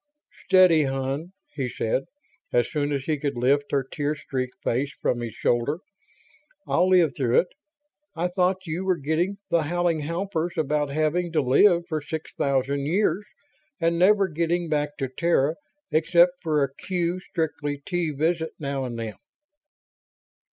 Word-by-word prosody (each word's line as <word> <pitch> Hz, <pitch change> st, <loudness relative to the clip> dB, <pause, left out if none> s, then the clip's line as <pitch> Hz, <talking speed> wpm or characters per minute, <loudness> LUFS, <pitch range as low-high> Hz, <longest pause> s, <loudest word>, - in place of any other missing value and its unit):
"Steady, 180 Hz, -5 st, +6 dB
hon," 135 Hz, +5 st, -3 dB, 0.2 s
he 135 Hz, -4 st, -2 dB
said, 115 Hz, +3 st, -1 dB, 0.5 s
as 120 Hz, -1 st, +2 dB
soon 145 Hz, -1 st, -1 dB
as 140 Hz, -2 st, -1 dB
he 150 Hz, 0 st, -1 dB
could 140 Hz, -3 st, -2 dB
lift 140 Hz, +4 st, +2 dB
her 140 Hz, -2 st, +1 dB
tear 145 Hz, +3 st, -2 dB
streaked 130 Hz, -3 st, -4 dB
face 135 Hz, +4 st, 0 dB
from 120 Hz, -, 0 dB
his 115 Hz, -2 st, -5 dB
shoulder. 120 Hz, +6 st, +1 dB, 0.9 s
"I'll 180 Hz, +2 st, +2 dB
live 175 Hz, -6 st, +4 dB
through 125 Hz, -3 st, +3 dB
it. 180 Hz, -, -12 dB, 0.7 s
I 175 Hz, +2 st, 0 dB
thought 185 Hz, +1 st, 0 dB
you 165 Hz, +3 st, -3 dB
were 185 Hz, -2 st, +1 dB
getting 165 Hz, +7 st, -1 dB
the 170 Hz, -, +4 dB
howling 170 Hz, +1 st, 0 dB
howpers 170 Hz, +2 st, -2 dB
about 150 Hz, -1 st, 0 dB
having 155 Hz, +4 st, 0 dB
to 155 Hz, -, +3 dB
live 170 Hz, +7 st, +4 dB
for 155 Hz, -3 st, -2 dB
six 160 Hz, +2 st, -6 dB
thousand 140 Hz, +1 st, 0 dB
years 205 Hz, +4 st, +1 dB, 0.6 s
and 170 Hz, 0 st, +1 dB
never 195 Hz, +2 st, +5 dB
getting 170 Hz, +1 st, -1 dB
back 150 Hz, -1 st, -1 dB
to 135 Hz, -, -2 dB
Terra 150 Hz, +1 st, +1 dB, 0.4 s
except 175 Hz, +3 st, +4 dB
for 155 Hz, -4 st, +1 dB
a 135 Hz, 0 st, -2 dB
Q 175 Hz, +2 st, -2 dB
strictly 150 Hz, -5 st, -3 dB
T 175 Hz, -3 st, -1 dB
visit 160 Hz, +3 st, -1 dB
now 140 Hz, -3 st, -3 dB
and 120 Hz, -2 st, -5 dB
then." 110 Hz, -2 st, -5 dB
155 Hz, 155 wpm, -25 LUFS, 140-175 Hz, 0.9 s, Steady